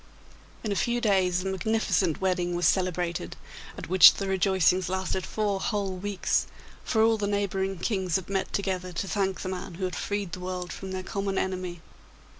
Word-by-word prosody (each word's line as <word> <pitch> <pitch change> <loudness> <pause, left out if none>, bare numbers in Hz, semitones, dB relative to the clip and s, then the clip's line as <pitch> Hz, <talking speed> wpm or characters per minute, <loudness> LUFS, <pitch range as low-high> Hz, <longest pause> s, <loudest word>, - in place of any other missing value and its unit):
In 215 - -2
a - - 0
few 235 +6 +1
days 185 -5 +2
a - - -3
magnificent 190 -3 0
wedding 180 -2 0
was 175 - 0
celebrated, 175 - 0 0.4
at - - -7
which 185 +1 +9
the 195 - -3
rejoicings 190 -2 +2
lasted 190 0 -2
four 205 -2 -1
whole 200 -2 -1
weeks, 200 +1 0 0.4
for 220 -2 +2
all 225 0 +4
the 205 - 0
neighbouring 195 -1 -1
kings 185 -3 -1
had 190 - -1
met 195 -1 -2
together 185 -2 -2
to 195 - -3
thank 190 -1 -1
the 185 - -3
man 180 -2 -5
who 185 +2 -2
had 180 - -3
freed 205 -3 -3
the 185 - -5
world 180 -1 -4
from 190 - -7
their 185 0 -4
common 195 0 -2
enemy. 185 -2 -3
190 Hz, 185 wpm, -27 LUFS, 180-200 Hz, 0.4 s, which